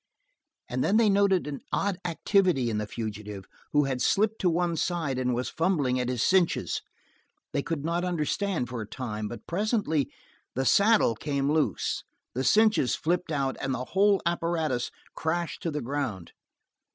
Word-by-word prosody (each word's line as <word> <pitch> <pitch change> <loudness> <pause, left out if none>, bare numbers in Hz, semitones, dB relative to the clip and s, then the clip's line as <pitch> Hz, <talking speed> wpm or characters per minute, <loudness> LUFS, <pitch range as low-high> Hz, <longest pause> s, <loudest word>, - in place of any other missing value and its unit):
And 130 +1 -1
then 205 - +3
they 225 -2 +5
noted 195 -2 +3
an 145 -2 -5
odd 195 -2 0
activity 175 - +2
in 105 - -1
the 105 - -3
fugitive, 105 -3 -6 0.3
who 150 0 +4
had 130 -2 -2
slipped 215 - +2
to 180 - +3
one 170 0 +1
side 160 -6 -1
and 125 -1 0
was 125 +1 -2
fumbling 150 -7 +1
at 125 0 -1
his 125 -3 0
cinches. 185 -3 +2 0.7
They 140 - +1
could 155 -1 -3
not 170 +2 0
understand 175 -2 -1
for 125 -2 -5
a 105 - -6
time, 110 -3 -4
but 120 - -8
presently 185 - 0 0.4
the 130 +1 0
saddle 205 - +5
came 140 +3 -1
loose, 155 0 0 0.3
the 130 - -1
cinches 215 - +4
flipped 175 +1 -1
out, 135 -3 -1
and 135 -1 -1
the 125 0 -4
whole 200 +1 +4
apparatus 165 -7 0 0.2
crashed 170 +1 -2
to 170 - -1
the 150 -1 -3
ground. 120 -9 -3
150 Hz, 165 wpm, -28 LUFS, 125-180 Hz, 0.7 s, they